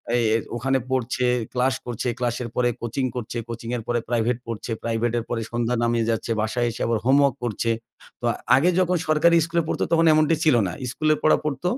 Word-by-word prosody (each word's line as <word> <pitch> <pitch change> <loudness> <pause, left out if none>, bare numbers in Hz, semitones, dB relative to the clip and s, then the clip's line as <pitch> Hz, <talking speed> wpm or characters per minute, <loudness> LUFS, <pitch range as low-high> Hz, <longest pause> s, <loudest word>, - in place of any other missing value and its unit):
এ - - +4 0.4
ওখানে 135 +3 +1
পড়ছে, 125 0 0 0.3
ক্লাস 130 +1 +2
করছে, 120 0 -4
ক্লাসের 120 -1 -2
পরে 120 -1 +2
কোচিং 120 +3 -2
করছে, 120 -1 -5
কোচিং 115 0 -6
এর 115 - -6
পরে 120 0 +1
প্রাইভেট 120 0 +1
পড়ছে, 115 0 -5
প্রাইভেট 115 0 0
এর - - -5
পরে 115 -1 -2
সন্ধ্যা 120 +1 0
নামিয়ে 115 -1 +1
যাচ্ছে। 115 0 -1
বাসায় 120 +2 0
এসে - - -8
আবার 115 - +1
হোমওয়র্ক 140 -1 +4
করছে। 115 0 -1 0.5
তো - - -3 0.3
আগে 155 +7 +4
যখন 180 -1 +2
সরকারি 155 +2 +4
স্কুলে 170 0 0
পড়ত - - -2
তখন 165 0 +4
এমনটি 155 +1 +3
ছিল 155 -5 +4
না। - - -3 0.2
স্কুলের 155 +1 +1
পড়া 155 - +5
পড়ত। 140 +1 -3
125 Hz, 195 wpm, -23 LUFS, 115-140 Hz, 0.5 s, পড়া